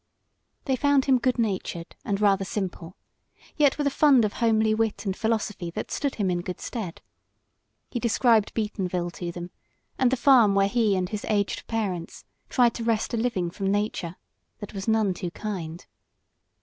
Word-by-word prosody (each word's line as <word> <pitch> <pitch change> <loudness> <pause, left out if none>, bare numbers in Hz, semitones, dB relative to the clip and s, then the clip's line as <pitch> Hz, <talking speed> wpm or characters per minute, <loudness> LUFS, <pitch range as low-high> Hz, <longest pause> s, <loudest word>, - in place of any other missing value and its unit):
They 265 - +1
found 285 0 +3
him 265 -2 +4
good 255 +1 +1
natured 190 -6 -2
and 200 -1 -1
rather 200 -2 +3
simple, 185 -3 -5 0.6
yet 290 -3 +3
with 295 - -1
a 280 - +2
fund 275 -6 +5
of 205 - -2
homely 220 -2 +2
wit 220 0 -1
and 190 -1 -1
philosophy 215 -5 -1
that 170 - -6
stood 280 -2 -1
him 195 -4 0
in 175 -1 -1
good 180 0 -6
stead. 205 -8 -6 0.9
He 240 - -2
described 230 -2 +3
Beatonville 185 -5 -2
to 175 0 -5
them, 175 +1 -7 0.5
and 255 - +4
the 260 - 0
farm 240 -6 +5
where 195 0 +4
he 215 -2 +2
and 185 -1 0
his 210 0 -4
aged 205 -2 0
parents 195 -7 -3 0.2
tried 245 -3 +3
to 230 - -5
wrest 225 0 0
a - - +1
living 210 -7 -1
from 195 +1 -2
nature 205 -4 -2 0.4
that 205 -1 -9
was 195 0 -5
none 220 -3 +2
too 180 0 -4
kind. 175 -3 -6
210 Hz, 175 wpm, -26 LUFS, 185-235 Hz, 0.9 s, fund